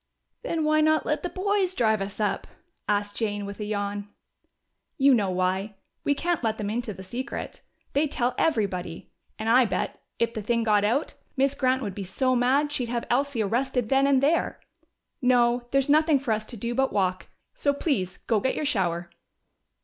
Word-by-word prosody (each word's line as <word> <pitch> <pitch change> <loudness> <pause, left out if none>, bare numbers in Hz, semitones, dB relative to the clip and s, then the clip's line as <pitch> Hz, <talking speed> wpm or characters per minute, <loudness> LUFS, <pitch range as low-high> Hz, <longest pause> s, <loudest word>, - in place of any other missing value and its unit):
"Then 335 -10 -1
why 310 0 +3
not 310 0 +3
let 300 - 0
the 355 - -3
boys 380 0 0
drive 220 - +2
us 195 +2 -5
up?" 210 -2 -1 0.4
asked 205 0 0
Jane, 205 -2 -1
with 200 +1 -7
a 210 - -3
yawn. 205 -1 -3 0.9
"You 275 0 +5
know 205 -6 +2
why. 185 +3 -1 0.3
We 285 - +2
can't 345 -1 -1
let 220 -1 0
them 205 -1 -3
into 235 0 -2
the 190 -1 -9
secret: 245 +8 -6 0.3
they'd 290 +1 +1
tell 245 0 0
everybody. 190 - -1 0.3
And 220 - -4
I 245 +2 +6
bet, 205 - -3 0.2
if 230 0 0
the 220 - -4
thing 230 +2 0
got 210 -2 +3
out, 240 +9 0 0.2
Miss 275 +1 +3
Grant 260 -1 +1
would 200 -3 -3
be 200 - -5
so 255 +8 0
mad 270 +4 +2
she'd 250 -5 -2
have 235 -1 -2
Elsie 265 -2 +1
arrested 245 +2 0
then 270 +1 +4
and 275 -1 +3
there. 320 +4 +1 0.6
No, 245 -1 +3
there's 275 0 +2
nothing 305 0 +4
for 255 -3 -2
us 215 0 -1
to 240 - -7
do 235 +3 -3
but 265 +2 +1
walk.... 185 -3 0 0.3
So 285 - +1
please 225 - -1
go 225 -3 +2
get 260 +6 0
your 305 - -2
shower." 180 -10 0
240 Hz, 190 wpm, -26 LUFS, 205-275 Hz, 0.9 s, I